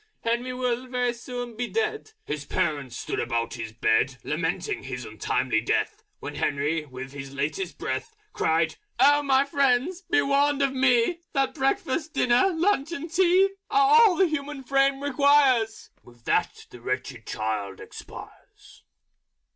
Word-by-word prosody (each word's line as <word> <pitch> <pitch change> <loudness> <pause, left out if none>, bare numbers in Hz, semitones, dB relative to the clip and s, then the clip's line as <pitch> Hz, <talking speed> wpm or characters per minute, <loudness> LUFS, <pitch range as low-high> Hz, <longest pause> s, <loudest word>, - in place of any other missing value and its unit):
Henry 235 +2 -1
will 250 0 -2
very 250 -1 0
soon 245 -1 -7
be 245 +2 -2
dead." 435 - -2
His 150 -1 -4
Parents 145 -4 -2
stood - - -3
about 115 -1 -1
his 115 -2 -6
Bed 115 +3 +1
Lamenting 165 +3 -2
his 130 -2 -6
Untimely 110 +2 -1
Death, 115 - -1 0.2
When - - -6
Henry, 150 +2 -1
with 130 0 -8
his 140 -1 -9
Latest 155 +6 -3
Breath, 445 +2 -4 0.2
Cried 160 0 +1 0.2
"Oh, 290 +1 +6
my 275 -1 +3
Friends, 280 +5 +1
be 350 0 +3
warned 280 +1 +2
by 275 - +3
me, 260 +4 +2
That 275 -3 +1
Breakfast, 310 +1 -1
Dinner, 250 +11 +3
Lunch 340 -3 +1
and 330 0 -6
Tea 375 +2 +4 0.2
Are 410 +1 +4
all 425 -6 +6
the 380 - +4
Human 295 -3 -4
Frame 275 +1 +2
requires 275 -5 +3
..." - - -38
With 120 -1 -19
that - - 0
the 120 - -12
Wretched 125 -1 -4
Child 110 -2 -3
expires. - - -12
250 Hz, 150 wpm, -26 LUFS, -, 0.2 s, Oh